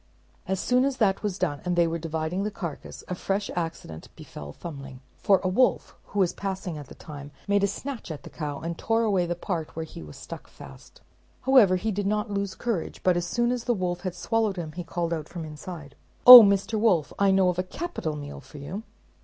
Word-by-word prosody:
As 190 0 -1
soon 250 +4 +2
as 275 -1 0
that 195 -4 +2
was 205 -3 -2
done, 150 -7 -2
and 180 -1 -1
they 170 -1 +4
were 165 0 -2
dividing 160 +3 -3
the 210 - -1
carcass, 170 -7 -7
a - - -3
fresh 195 +3 -2
accident 165 - -5
befell 75 0 -10
Thumbling, 135 - -9 0.2
for 195 -2 +4
a - - +1
wolf, 245 +8 +1
who 205 - -9
was 185 -3 +2
passing 190 -3 -4
at 145 -3 -8
the - - -12
time, 145 -2 -10 0.2
made 200 0 +2
a - - +4
snatch 255 +3 -6
at 155 -3 -7
the - - -11
cow, 145 -3 -5
and 170 0 -5
tore 225 0 +1
away 195 -5 +1
the 175 - -2
part 170 -3 -4
where 160 0 -4
he 155 - -10
was 75 -2 -11
stuck - - -9
fast. - - -14 0.4
However, 250 -8 +5
he 215 +4 -1
did 205 0 -2
not 210 +1 -1
lose 200 -1 -2
courage, 230 -9 -3
but 185 -1 +3
as 175 0 -1
soon 240 +6 +1
as 245 -2 -3
the 240 - +1
wolf 180 -2 -2
had 185 -2 -4
swallowed 220 0 0
him, 165 -3 -5
he 175 +3 -6
called 170 0 -2
out 155 -2 -5
from 170 -2 -6
inside, 155 -1 -9 0.3
"Oh, 250 -1 +15
Mr. 200 +1 +2
Wolf, 190 -9 +2
I 200 0 +4
know 190 -1 +4
of 180 0 -2
a - - +1
capital 185 - -4
meal 145 -1 -7
for 135 +2 -14
you." 160 +9 -6
180 Hz, 230 wpm, -26 LUFS, 160-205 Hz, 0.4 s, Oh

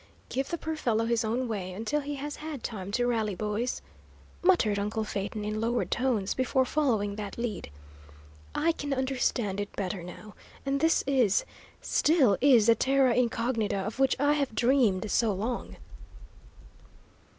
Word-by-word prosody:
"Give 270 +1 -2
the 340 - -2
poor 320 -1 -4
fellow 230 -6 0
his 230 0 +1
own 240 +4 -1
way 190 -5 -4
until 225 +10 -1
he 290 +1 -4
has 290 +1 -5
had 305 -5 -7
time 200 -3 -5
to 245 +2 +1
rally, 220 -5 0
boys," 215 +5 -2 0.6
muttered 290 - +3
uncle 210 +2 -1
Phaeton, 210 0 -4
in 215 +1 -2
lowered 235 +1 -1
tones, 240 -6 0
before 260 +1 +1
following 225 -9 0
that 205 -2 -6
lead. 235 - -4 0.9
"I 335 - +2
can 285 -3 -3
understand 250 -6 -1
it 205 - -5
better, 190 -1 -3
now, 180 +4 -10 0.3
and 275 0 0
this 325 +2 +3
is 255 -8 +2 0.4
still 285 - +3
is 250 -6 +6
the 230 - +7
terra 265 +1 +3
incognita 230 -3 0
of 205 +6 -4
which 270 -1 +3
I 290 +1 +3
have 280 -6 -1
dreamed 230 -6 +2
so 225 -3 +2
long!" 225 +6 -4
235 Hz, 160 wpm, -28 LUFS, 210-270 Hz, 0.9 s, the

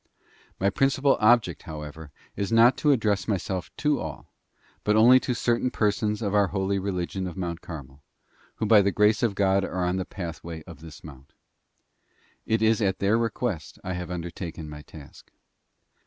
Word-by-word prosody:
My 100 +1 +2
principal 135 +4 +2
object, 110 -8 +3
however, 75 0 -8 0.3
is 100 +1 -3
not 115 +2 +6
to 150 - +3
address 105 -6 +1
myself 95 -3 -2
to 150 -2 +1
all, 80 -2 -8 0.5
but 105 - +2
only 120 +4 +7
to 125 - -2
certain 120 +1 +1
persons 105 0 0
of 100 -1 -1
our 100 -1 +4
holy 95 +1 -1
religion 95 -1 -3
of 90 - -8
Mount 85 -2 -4
Carmel, 70 -4 -10 0.5
who - - -2
by 105 -1 +6
the 100 - +2
grace 105 +2 +3
of 115 -4 +1
God 95 0 +2
are 90 -2 -2
on 90 +1 0
the 95 - -1
pathway 85 -3 -7
of 85 -1 -12
this 80 -1 -12
mount. 70 -3 -13 1.1
It 110 0 +1
is 110 0 +3
at 95 -2 +1
their 100 +2 +2
request 110 - -3
I 95 - -3
have 90 -1 -5
undertaken 85 -2 -6
my 75 0 -9
task. 75 -1 -14
95 Hz, 170 wpm, -26 LUFS, 85-110 Hz, 1.1 s, only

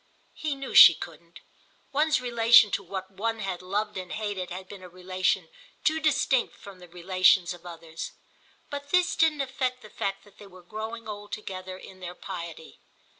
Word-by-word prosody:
He 305 -2 -3
knew 275 0 -7
she - - +11
couldn't: - - -11 0.5
one's 305 +3 +2
relation 235 -3 +6
to - - 0
what 190 0 -6
one 225 +4 -2
had 195 -4 -4
loved 205 +3 -2
and 185 -1 -6
hated 205 -4 -3
had 185 +1 -7
been 200 -1 -10
a 180 - -11
relation 185 0 -1 0.4
too 315 +1 +2
distinct 280 -4 +1
from 195 -2 -13
the 180 - -13
relations 185 0 +3
of 175 0 -12
others. 165 -1 -8 0.6
But 285 0 -6
this 360 +1 +2
didn't 315 -3 +3
affect 260 -2 -2
the 215 - -13
fact 195 0 -3
that 205 -1 -21
they 205 - -12
were 185 -2 -15
growing 220 +4 -7
old 205 -1 -8
together 185 -3 -6
in 190 0 -13
their 180 -1 -7
piety. 170 -4 -8
195 Hz, 175 wpm, -27 LUFS, 185-235 Hz, 0.6 s, she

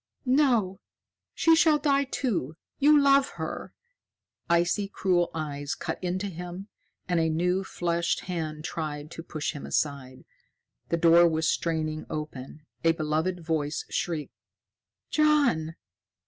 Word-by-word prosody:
"No! 250 -8 +2 0.6
She 330 0 +5
shall 320 -2 +5
die, 280 -1 +2
too. 195 - -2 0.2
You 295 +1 +6
love 275 -1 +4
her!" - - -5 0.8
Icy, 175 +4 +2
cruel 180 -3 +1
eyes 145 0 -3
cut - - -5
into 185 +2 -1
him, 180 +2 -7 0.4
and 175 -2 +1
a 160 0 +2
new 180 +4 +1
fleshed 170 -2 -1
hand 155 -4 -4
tried 150 -1 -5
to - - -7
push 155 -2 -3
him 145 - -8
aside. 135 -3 -2 0.6
The 170 - +1
door 170 +1 +6
was 160 -1 0
straining 155 -2 -1
open. 150 0 -7 0.2
A 165 0 +4
beloved 160 +3 -2
voice 155 -2 -1
shrieked. 160 -4 -2 0.8
"John!" 280 - +2
170 Hz, 125 wpm, -27 LUFS, 155-195 Hz, 0.8 s, You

